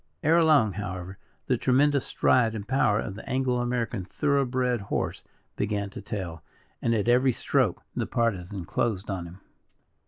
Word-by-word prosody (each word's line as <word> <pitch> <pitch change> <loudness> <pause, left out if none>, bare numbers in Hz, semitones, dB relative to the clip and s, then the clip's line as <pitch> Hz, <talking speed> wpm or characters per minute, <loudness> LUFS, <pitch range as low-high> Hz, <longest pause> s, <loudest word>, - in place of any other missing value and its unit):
Ere 165 +2 +5
long, 140 -10 +4
however, 95 -1 -6 0.3
the 125 - +1
tremendous 140 +3 +2
stride 115 -3 +3
and 105 -1 -6
power 120 -5 +2
of 95 - -4
the 105 - -10
Anglo 130 -1 +1
American 120 -4 -1
thorough 140 +8 +1
bred 125 -2 0
horse 100 - -3 0.3
began 100 -1 -2
to - - -8
tell; 85 -6 -5 0.4
and, 115 -1 +1
at 105 0 0
every 125 +1 +4
stroke, - - 0
the - - -1
Partisan 100 -5 -1
closed 100 +1 -1
on 90 -3 -4
him. 90 +3 -13
115 Hz, 160 wpm, -27 LUFS, 100-130 Hz, 0.4 s, Ere